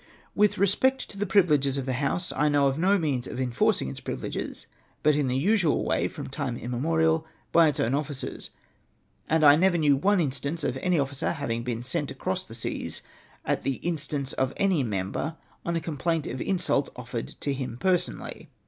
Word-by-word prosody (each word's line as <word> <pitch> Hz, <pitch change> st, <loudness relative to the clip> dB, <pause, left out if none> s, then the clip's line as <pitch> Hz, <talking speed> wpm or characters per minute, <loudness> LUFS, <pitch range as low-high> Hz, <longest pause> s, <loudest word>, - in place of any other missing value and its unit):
With 210 Hz, 0 st, +3 dB
respect 210 Hz, +8 st, +2 dB
to 200 Hz, -, -10 dB
the 205 Hz, -, 0 dB
privileges 150 Hz, -9 st, +3 dB
of 135 Hz, -, -2 dB
the 130 Hz, -, -1 dB
House, 145 Hz, +7 st, -1 dB
I 150 Hz, +2 st, +3 dB
know 145 Hz, -1 st, +4 dB
of 135 Hz, +2 st, -1 dB
no 195 Hz, +4 st, +4 dB
means 140 Hz, -8 st, -1 dB
of -, -, -6 dB
enforcing 125 Hz, -, +1 dB
its -, -, -6 dB
privileges, -, -, -5 dB, 0.4 s
but 150 Hz, -, +5 dB
in 145 Hz, -2 st, +1 dB
the 125 Hz, +1 st, 0 dB
usual 185 Hz, +1 st, +2 dB
way, -, -, +1 dB
from -, -, -7 dB
time 120 Hz, -2 st, -3 dB
immemorial, 160 Hz, +7 st, +1 dB, 0.2 s
by 165 Hz, -1 st, +6 dB
its 150 Hz, -, 0 dB
own 120 Hz, -, +1 dB
officers; 145 Hz, -1 st, -3 dB, 0.8 s
and 160 Hz, 0 st, +3 dB
I 145 Hz, -1 st, +9 dB
never 175 Hz, +2 st, +3 dB
knew 150 Hz, -3 st, +4 dB
one 195 Hz, +8 st, +2 dB
instance 145 Hz, +1 st, -1 dB
of -, -, 0 dB
any 180 Hz, +5 st, +1 dB
officer 140 Hz, +3 st, -1 dB
having 115 Hz, -7 st, -2 dB
been 120 Hz, -1 st, -3 dB
sent 125 Hz, -, -1 dB
across -, -, -3 dB
the -, -, -8 dB
seas -, -, -4 dB, 0.4 s
at -, -, 0 dB
the 135 Hz, -, -1 dB
instance 150 Hz, -5 st, -2 dB
of 130 Hz, 0 st, 0 dB
any 190 Hz, -6 st, +2 dB
member, 105 Hz, -, -2 dB, 0.3 s
on 170 Hz, -, -1 dB
a -, -, +1 dB
comjilaint 165 Hz, 0 st, -1 dB
of 130 Hz, -, -5 dB
insult 175 Hz, -7 st, +1 dB
offered 120 Hz, -1 st, -5 dB
to 140 Hz, -, -1 dB
him 130 Hz, -3 st, -4 dB
personally. 185 Hz, +3 st, -1 dB
145 Hz, 190 wpm, -27 LUFS, 130-170 Hz, 0.8 s, I